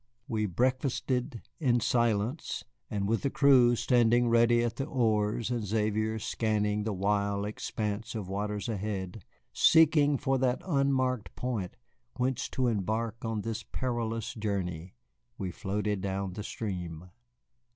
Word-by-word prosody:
We 110 -5 0
breakfasted 125 - -1 0.2
in 125 -6 +3
silence, 115 +4 0 0.3
and 100 -3 -1
with 115 +2 +1
the 140 - 0
crew 130 -4 +5
standing 120 0 +3
ready 120 0 +4
at 120 0 -2
the 135 - -1
oars 110 -3 +1
and 120 -2 -1
Xavier 110 +1 0
scanning 105 -1 0
the 110 - 0
wide 100 +1 0
expanse 105 +1 -4
of 105 -4 -4
waters 105 +1 -3
ahead, 100 -2 -4 0.3
seeking 150 -3 +5
for 135 +1 0
that 125 -1 +1
unmarked 135 - 0
point 115 -8 -3 0.4
whence 125 0 -1
to 130 - 0
embark 115 +1 -1
on 115 -2 -2
this 115 +1 -3
perilous 115 -3 -3
journey, 95 - -3 0.4
we 95 -2 -3
floated 105 +2 -2
down 95 -1 -2
the 105 - -5
stream. 90 -6 -5
110 Hz, 130 wpm, -30 LUFS, 105-125 Hz, 0.4 s, crew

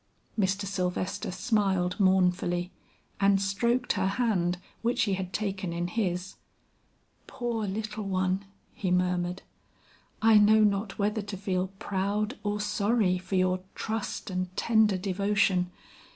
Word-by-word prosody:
Mr. 195 -1 0
Sylvester 185 -1 -2
smiled 190 -2 0
mournfully, 180 -2 +2 0.5
and 200 0 +4
stroked 235 +6 +1
her 190 -2 0
hand 195 -5 +1 0.2
which 240 +2 +1
he 200 - +1
had 185 -1 -3
taken 195 -4 -2
in 170 +1 -2
his. 180 -2 -2 0.9
"Poor 235 -3 -2
little 215 +1 -4
one," 190 0 0 0.3
he 190 - -2
murmured. 180 0 0 0.8
"I 220 -1 +6
know 215 +1 +6
not 200 -1 0
whether 210 +1 0
to 205 -1 -6
feel 185 -1 -1
proud 205 +5 -1
or 205 0 -1
sorry 210 -2 +1
for 185 +2 -4
your 185 0 +2 0.2
trust 220 -2 -3
and 185 0 -1
tender 220 -4 +3
devotion. 195 -1 +1
195 Hz, 125 wpm, -28 LUFS, 185-210 Hz, 0.9 s, I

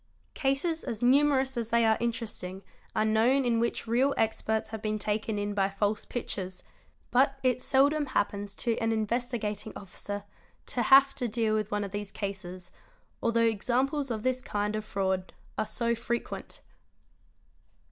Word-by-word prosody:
Cases 300 +4 0
as 225 0 -4
numerous 265 0 +4
as 230 -2 -2
they 235 0 +4
are 220 0 +5
interesting 215 -5 -3 0.3
are 215 - +2
known 235 +5 +3
in 235 -1 +2
which 235 0 -1
real 250 +5 +2
experts 220 0 0
have 220 -1 -6
been 215 0 -1
taken 210 +1 -1
in 205 0 -1
by 195 -1 +2
false 205 +2 -1
pictures; 190 -6 -4 0.5
but 270 +2 +4
it 255 -1 +2
seldom 285 +2 +3
happens 205 -5 -1
to 235 -2 0
— - - -2
an 225 0 +2
Investigating 220 -1 -1
Officer 205 +1 -6 0.4
to 245 - -1
have 275 +3 +7
to 250 - -2
deal 225 -1 +1
with 215 -1 0
one 205 -1 -1
of 200 - -5
these 205 0 -4
cases, 185 -3 -5 0.5
although 230 0 +2
examples 255 +6 +1
of 220 -2 -3
this 255 0 +1
kind 210 -4 -1
of 215 - -2
fraud 190 -2 -1 0.2
are 215 - -1
so 235 +2 0
frequent. 235 +1 -4
225 Hz, 160 wpm, -29 LUFS, 205-250 Hz, 0.5 s, have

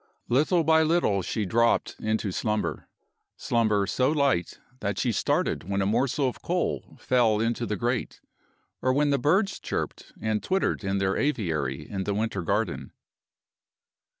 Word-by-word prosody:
Little 155 +7 +3
by 160 +1 +5
little 155 - +2
she 105 +4 -2
dropped 115 +4 +2
into 110 -2 -1
slumber 105 +3 -2 0.5
slumber 110 -4 +1
so 130 +6 +1
light 140 - +1 0.2
that 100 -4 -2
she 120 - +1
started 95 - 0
when 100 0 0
a 95 - +1
morsel 130 +6 +1
of 125 - -5
coal 180 +1 -2
fell 115 -4 +2
into 115 +1 -1
the 105 - -1
grate, 120 +4 -2 0.6
or 130 - +2
when 145 +1 +2
the 140 - +2
birds 190 - +2
chirped - - -4
and 110 -1 -1
twittered 190 - 0
in 95 0 0
their 95 0 0
aviary 80 - -1
in 95 -2 -4
the 100 - -1
winter 105 -2 -1
garden. 85 - -2
115 Hz, 150 wpm, -26 LUFS, 100-140 Hz, 0.6 s, by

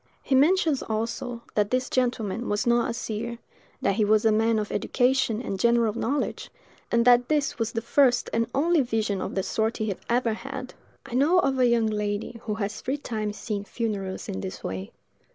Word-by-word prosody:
He 275 - -1
mentions, 305 +1 +4
also, 230 +2 -3
that 205 -1 +1
this 255 +1 0
gentleman 240 -3 -1
was 205 0 0
not 240 0 +3
a - - -1
seer; 235 0 -4 0.5
that 200 0 +1
he 220 - +3
was 215 +1 +3
a 220 - +5
man 225 +1 +2
of 210 -1 -2
education 250 -3 +1
and 195 -5 -4
general 235 0 +3
knowledge; 250 +5 -2 0.4
and 235 0 +3
that 245 0 +6
this 295 -4 0
was 225 -1 -1
the 225 - -2
first 245 0 +3
and 230 0 +1
only 325 +3 +3
vision 220 -5 -1
of - - -4
the 190 - 0
sort 220 +3 -1
he 215 -3 -1 0.2
ever 235 -1 +2
had. 260 +2 -7 0.3
I 270 - -10
know 290 +8 +4
of 275 -6 +2
a 250 - +5
young 235 -1 +3
lady 210 +1 -2
who 210 -2 -2
has 210 0 -3
three 270 +3 -2
times 215 -6 -4
seen 210 -3 -3
funerals 205 -4 -4
in 95 - -4
this 95 - -6
way. 95 +1 -5
230 Hz, 195 wpm, -26 LUFS, 215-250 Hz, 0.5 s, that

